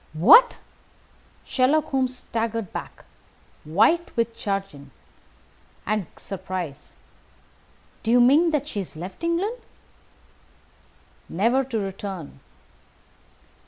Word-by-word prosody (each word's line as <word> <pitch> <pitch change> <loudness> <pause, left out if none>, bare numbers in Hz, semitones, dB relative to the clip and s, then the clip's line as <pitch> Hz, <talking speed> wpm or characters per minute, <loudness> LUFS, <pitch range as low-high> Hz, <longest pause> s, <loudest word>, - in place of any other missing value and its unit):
"What!" 460 - +7 0.9
Sherlock 295 +4 +1
Holmes 260 -2 -1
staggered 230 -4 -3
back, - - -8 0.6
white 225 - +2
with 230 0 0
chagrin 195 -10 -4 1.0
and 210 -4 -1
surprise. 185 -6 -7 1.1
"Do 225 - -4
you 245 +1 +5
mean 285 +8 +5
that 295 -2 -1
she 215 - -4
has 190 - -7
left 185 - -9
England?" 360 +8 -1 1.7
"Never 235 +9 +2
to 245 -3 -3
return." 195 -7 -6
225 Hz, 90 wpm, -24 LUFS, 190-270 Hz, 1.7 s, What